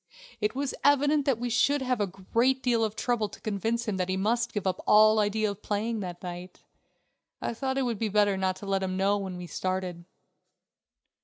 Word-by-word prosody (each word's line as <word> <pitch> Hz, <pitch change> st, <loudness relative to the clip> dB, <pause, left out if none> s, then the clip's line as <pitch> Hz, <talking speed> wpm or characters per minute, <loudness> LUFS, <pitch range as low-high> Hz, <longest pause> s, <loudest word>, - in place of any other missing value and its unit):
It 210 Hz, +2 st, -1 dB
was 275 Hz, 0 st, -2 dB
evident 285 Hz, +1 st, +3 dB
that 265 Hz, -5 st, +3 dB
we 240 Hz, +1 st, -3 dB
should 280 Hz, +4 st, +2 dB
have 250 Hz, -3 st, 0 dB
a 205 Hz, -, +1 dB
great 230 Hz, +8 st, 0 dB
deal 235 Hz, -3 st, +2 dB
of 215 Hz, -1 st, -1 dB
trouble 230 Hz, -4 st, 0 dB
to -, -, -12 dB
convince 225 Hz, +3 st, -2 dB
him 205 Hz, -3 st, -1 dB
that 185 Hz, 0 st, -1 dB
he 185 Hz, -, 0 dB
must 235 Hz, +4 st, 0 dB
give 205 Hz, -2 st, -3 dB
up 190 Hz, -, -1 dB
all 215 Hz, +1 st, +6 dB
idea 210 Hz, 0 st, +1 dB
of 200 Hz, +1 st, -10 dB
playing 220 Hz, +2 st, -2 dB
that 180 Hz, -3 st, -6 dB
night. 180 Hz, 0 st, -8 dB, 0.8 s
I -, -, -3 dB
thought 265 Hz, +3 st, -2 dB
it 270 Hz, -, +1 dB
would 235 Hz, -5 st, -2 dB
be 225 Hz, -, 0 dB
better 205 Hz, -1 st, +3 dB
not 190 Hz, -1 st, 0 dB
to 200 Hz, -, -10 dB
let 195 Hz, -1 st, 0 dB
him 185 Hz, -1 st, -2 dB
know 200 Hz, +2 st, +2 dB
when 190 Hz, -2 st, -5 dB
we 180 Hz, -, -7 dB
started. 185 Hz, -1 st, -3 dB
210 Hz, 215 wpm, -28 LUFS, 190-235 Hz, 0.8 s, all